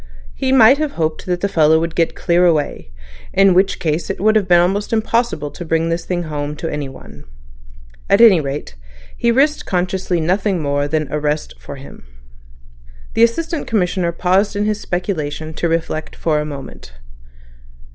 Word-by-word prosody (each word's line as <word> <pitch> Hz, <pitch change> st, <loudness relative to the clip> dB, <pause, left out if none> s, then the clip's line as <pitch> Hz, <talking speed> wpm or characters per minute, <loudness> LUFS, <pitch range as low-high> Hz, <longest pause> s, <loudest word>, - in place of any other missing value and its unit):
He 260 Hz, -, -2 dB
might 265 Hz, +2 st, +6 dB
have 305 Hz, -2 st, -2 dB
hoped 160 Hz, 0 st, -3 dB
that 180 Hz, -1 st, -1 dB
the 200 Hz, -, +1 dB
fellow 160 Hz, -4 st, +3 dB
would 165 Hz, 0 st, -3 dB
get 165 Hz, -1 st, 0 dB
clear 175 Hz, 0 st, +2 dB
away; 150 Hz, -, -1 dB, 0.4 s
in 195 Hz, -1 st, +5 dB
which 190 Hz, +2 st, +2 dB
case 160 Hz, -1 st, -2 dB
it -, -, -3 dB
would 215 Hz, +3 st, +3 dB
have 205 Hz, -3 st, +2 dB
been 175 Hz, -1 st, +5 dB
almost 195 Hz, +4 st, 0 dB
impossible 225 Hz, -9 st, 0 dB
to -, -, -8 dB
bring 165 Hz, 0 st, 0 dB
this 165 Hz, 0 st, -2 dB
thing 175 Hz, -1 st, -2 dB
home 150 Hz, -2 st, -4 dB
to 165 Hz, -, -5 dB
anyone. 135 Hz, -, -8 dB, 0.9 s
At 200 Hz, -, +4 dB
any 215 Hz, -8 st, +7 dB
rate 140 Hz, -, -5 dB, 0.4 s
he 235 Hz, -, +1 dB
risked 285 Hz, +5 st, +1 dB
consciously 180 Hz, -1 st, -1 dB
nothing 185 Hz, +3 st, 0 dB
more 145 Hz, -1 st, -1 dB
but 155 Hz, 0 st, 0 dB
arrest 150 Hz, 0 st, -2 dB
for -, -, -9 dB
him." 135 Hz, -, -13 dB, 1.1 s
The -, -, +1 dB
Assistant 320 Hz, +8 st, +1 dB
Commissioner 180 Hz, -4 st, 0 dB
paused 185 Hz, +4 st, +1 dB
in 205 Hz, +1 st, 0 dB
his 215 Hz, 0 st, -1 dB
speculations 160 Hz, -4 st, -4 dB
to 170 Hz, -, 0 dB
reflect 160 Hz, -2 st, -3 dB
for 155 Hz, -2 st, 0 dB
a 150 Hz, -, -2 dB
moment. 140 Hz, -, -9 dB
175 Hz, 170 wpm, -18 LUFS, 155-200 Hz, 1.1 s, any